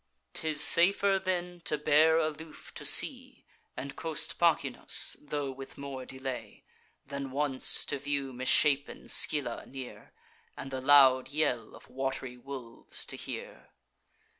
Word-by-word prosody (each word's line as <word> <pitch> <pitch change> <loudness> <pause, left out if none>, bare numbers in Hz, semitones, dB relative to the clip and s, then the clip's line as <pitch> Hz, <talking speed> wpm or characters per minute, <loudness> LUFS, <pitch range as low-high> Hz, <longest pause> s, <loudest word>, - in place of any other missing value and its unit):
'Tis 155 -2 +4
safer, 195 +4 +5
then, 180 -2 -4
to 150 - +1
bear 155 +2 +3
aloof 155 0 -6
to - - -8
sea, - - +2 0.3
And 135 +1 -7
coast 160 -2 -3
Pachynus, 150 -6 +2
tho' 145 -2 -5
with 135 0 -12
more 135 -2 -8
delay, 130 -1 -8 0.4
Than 140 -1 -7
once 135 0 0
to 140 - -4
view 140 -1 -4
misshapen 140 +3 0
Scylla 135 -6 +3
near, 130 -2 -11 0.5
And 135 - -8
the 130 -1 -5
loud 130 -2 +5
yell 130 -6 -2
of - - -16
wat'ry 135 -1 -5
wolves 125 -2 -6
to - - -7
hear. - - -9
140 Hz, 130 wpm, -29 LUFS, 130-155 Hz, 0.5 s, safer